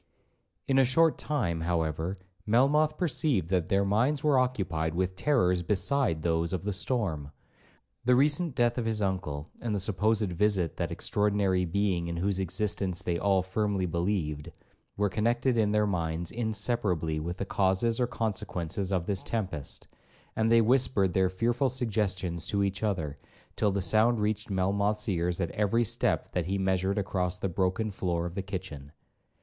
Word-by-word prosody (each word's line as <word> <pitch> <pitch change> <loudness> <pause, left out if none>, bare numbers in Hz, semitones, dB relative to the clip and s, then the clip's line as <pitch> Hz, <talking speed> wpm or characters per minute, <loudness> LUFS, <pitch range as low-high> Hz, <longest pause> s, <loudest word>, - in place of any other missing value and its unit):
In 135 -1 +3
a - - +6
short 160 +6 +3
time, 95 - -1
however, 80 +2 -1 0.3
Melmoth 150 +7 +3
perceived 140 - 0
that 90 -3 +1
their 100 +1 +2
minds 125 +9 +1
were 145 -4 +4
occupied 90 -11 -1
with 95 +1 -1
terrors 95 -9 +2
beside 100 - 0
those 85 0 0
of 95 - -2
the 105 0 -2
storm. 95 - -2 0.8
The 125 0 +5
recent 145 +3 +2
death 120 0 +2
of 120 - -2
his 110 -2 -1
uncle, 90 -6 -2
and 115 -3 -2
the - - 0
supposed 105 0 +1
visit 95 -3 +1
of - - -30
that - - -2
extraordinary 100 -3 +1
being 90 -1 0
in 85 0 -4
whose 95 +2 0
existence 95 0 -1
they 85 -1 -1
all 95 -2 +2
firmly 100 0 -1
believed, 85 -4 -2 0.5
were 105 0 +2
connected 120 +5 +1
in 110 -2 +2
their 105 0 +2
minds 85 -3 -2
inseparably 105 -8 0
with 85 +4 -4
the 100 - -3
causes 95 +5 +1
or 125 - +2
consequences 100 -5 -3
of 90 -3 0
this 100 -1 0
tempest, 95 -11 -4 0.5
and 110 +1 +1
they 115 0 +6
whispered 115 -6 +2
their 95 -1 +3
fearful 120 +8 0
suggestions 95 - -1
to 100 +1 +1
each 100 0 -2
other, 80 -9 -2 0.4
till 105 - +2
the 100 0 -1
sound 110 +6 +3
reached 105 0 -1
Melmoth's 100 +2 0
ears 90 -2 0
at 85 -3 -1
every 105 +3 +1
step 115 +1 0
that 90 -2 -2
he 100 +1 0
measured 95 +1 0
across 90 -2 -1
the 95 - -2
broken 95 +5 -1
floor 85 -3 -2
of 85 - -5
the 95 - -3
kitchen. 90 -7 -7
100 Hz, 165 wpm, -29 LUFS, 90-110 Hz, 0.8 s, a